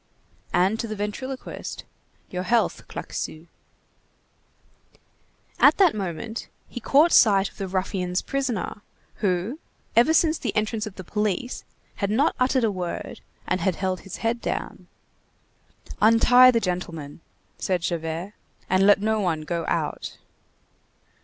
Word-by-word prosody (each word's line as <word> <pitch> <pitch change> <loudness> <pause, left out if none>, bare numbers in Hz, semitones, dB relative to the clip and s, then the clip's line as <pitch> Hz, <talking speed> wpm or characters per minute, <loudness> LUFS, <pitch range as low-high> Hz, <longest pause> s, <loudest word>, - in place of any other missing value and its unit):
And 190 +5 +2
to 230 - -2
the 215 - -4
ventriloquist:— 235 +6 -5 0.5
"Your 180 - -2
health, 235 +5 0
Claquesous." 155 +1 -6 2.1
At - - +6
that 375 -5 +5
moment, 205 +3 -5 0.2
he - - -7
caught 295 +8 +4
sight 200 -3 +5
of - - -23
the 195 - -3
ruffians' 185 -1 -1
prisoner, 250 -7 -2 0.4
who, 195 - -1 0.4
ever 240 +7 +5
since 320 0 +3
the - - -3
entrance 215 +1 -1
of 200 - -9
the 190 - -8
police, 210 +5 -2 0.3
had 200 - -1
not 260 +9 +2
uttered 255 0 +2
a 220 - +2
word, 180 -3 -5 0.2
and 185 -1 -1
had 185 0 +1
held 185 0 -2
his 195 - -8
head 235 +1 0
down. - - -4 1.1
"Untie 240 +3 +7
the 235 -2 +3
gentleman!" 175 -6 -4 0.4
said 180 -3 -1
Javert, 170 +3 -3 0.4
"and 190 +1 +4
let 205 -1 +6
no 220 +1 +1
one 170 -6 0
go 165 +1 -3
out!" - - -2
205 Hz, 135 wpm, -24 LUFS, 180-235 Hz, 2.1 s, Untie